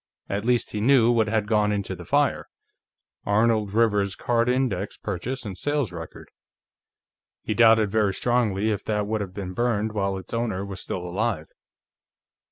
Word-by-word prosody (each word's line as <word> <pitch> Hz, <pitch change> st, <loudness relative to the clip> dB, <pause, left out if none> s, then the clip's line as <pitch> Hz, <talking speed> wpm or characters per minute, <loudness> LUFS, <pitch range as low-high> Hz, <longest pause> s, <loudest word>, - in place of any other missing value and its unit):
At 100 Hz, +2 st, -3 dB
least, 120 Hz, -1 st, +1 dB
he 105 Hz, -, -3 dB
knew 120 Hz, -1 st, +5 dB
what 115 Hz, -2 st, +2 dB
had 110 Hz, -1 st, 0 dB
gone 105 Hz, -1 st, +2 dB
into 100 Hz, -2 st, -2 dB
the 90 Hz, 0 st, -10 dB
fire: -, -, +1 dB, 0.8 s
Arnold 110 Hz, 0 st, +2 dB
Rivers's 105 Hz, -3 st, +2 dB
card 120 Hz, 0 st, +1 dB
index 125 Hz, -7 st, -1 dB
purchase 125 Hz, +8 st, -4 dB
and 100 Hz, -3 st, -5 dB
sales 145 Hz, -1 st, -1 dB
record. 85 Hz, -2 st, -9 dB, 1.1 s
He 110 Hz, -, -1 dB
doubted 110 Hz, -2 st, +5 dB
very 105 Hz, -3 st, +1 dB
strongly 110 Hz, -4 st, +1 dB
if 105 Hz, -, -3 dB
that 105 Hz, -1 st, 0 dB
would 110 Hz, +1 st, -2 dB
have 95 Hz, -2 st, -6 dB
been 95 Hz, -3 st, -5 dB
burned 110 Hz, -1 st, 0 dB
while 100 Hz, -2 st, -1 dB
its 95 Hz, -, -10 dB
owner 110 Hz, -5 st, -1 dB
was 95 Hz, -2 st, -7 dB
still 90 Hz, -1 st, -4 dB
alive. 95 Hz, -3 st, -2 dB
105 Hz, 165 wpm, -25 LUFS, 100-115 Hz, 1.1 s, knew